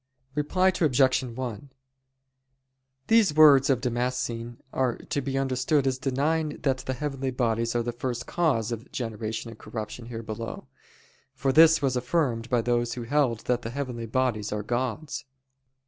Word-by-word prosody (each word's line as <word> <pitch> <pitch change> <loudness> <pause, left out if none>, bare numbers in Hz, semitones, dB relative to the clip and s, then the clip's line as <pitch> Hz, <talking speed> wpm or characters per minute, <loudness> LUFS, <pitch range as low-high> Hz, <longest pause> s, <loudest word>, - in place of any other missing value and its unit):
Reply 165 +6 +2
Obj. 135 -8 +3
1: 125 +1 -6 1.3
These 225 -5 +4
words 145 -3 +7
of 130 -3 +2
Damascene 120 -1 -2 0.2
are 130 -3 0
to 140 - -3
be 135 0 -2
understood 135 +2 +1
as 130 -1 0
denying 150 +3 0
that 135 -2 +2
the 130 - -4
heavenly 135 -1 -3
bodies 115 -2 0
are 120 - +1
the 120 - -2
first 120 0 -4
cause 130 -10 0
of 115 +2 -6
generation 115 -1 -4
and 115 - -13
corruption 110 +2 -6
here 115 -1 -6
below; 115 +1 -6 0.7
for 135 -1 0
this 160 0 +7
was 130 -2 +1
affirmed 125 -3 0
by 120 -2 +2
those 120 0 0
who 120 - -5
held 125 -3 +1
that 125 -1 0
the 115 - -5
heavenly 125 -3 -4
bodies 115 -3 0
are 105 0 -2
gods. 125 +7 -3
125 Hz, 155 wpm, -27 LUFS, 115-140 Hz, 1.3 s, words